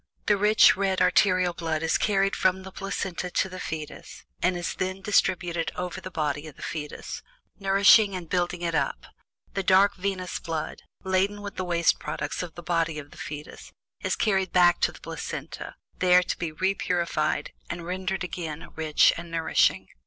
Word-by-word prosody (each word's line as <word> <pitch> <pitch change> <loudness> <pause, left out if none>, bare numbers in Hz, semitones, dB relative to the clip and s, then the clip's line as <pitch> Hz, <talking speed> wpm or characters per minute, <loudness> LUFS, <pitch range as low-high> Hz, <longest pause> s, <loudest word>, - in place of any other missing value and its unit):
The 210 - +4
rich 210 +2 +6
red 190 -1 0
arterial 185 -3 +3
blood 165 -2 -2
is 160 - +2
carried 195 -1 +2
from 185 0 +1
the 190 - -9
placenta 190 -2 -4
to 185 - +1
the 185 0 -8
fetus, 155 -3 -7 0.2
and 180 0 +2
is 175 - -3
then 185 +1 -3
distributed 175 -4 +1
over 180 +1 -4
the 185 - -7
body 150 -3 -2
of 150 - -11
the - - -11
fetus, 150 -2 -5 0.4
nourishing 200 +1 +5
and 180 -2 -6
building 175 0 -1
it 170 -1 -1
up; 140 -3 -1 0.5
the 195 - -1
dark 195 +1 +4
venous 185 -1 -3
blood, 160 -2 -4 0.2
laden 195 +2 0
with 200 -1 -6
the 185 - -2
waste 170 -1 +2
products - - -4
of 175 -3 -7
the 175 - -9
body 165 -2 0
of 145 -1 -8
the - - -15
fetus, 150 0 -8 0.3
is - - 0
carried 190 -4 +1
back 175 -1 +5
to - - +3
the - - -14
placenta, - - -6 0.2
there 180 0 +5
to - - -2
be 170 -2 -2
repurified 175 -2 0 0.2
and 175 -1 -5
rendered 185 +1 -2
again 165 -4 -5
rich 155 -1 +4
and 170 0 -7
nourishing. 165 -1 +2
180 Hz, 175 wpm, -26 LUFS, 165-190 Hz, 0.5 s, rich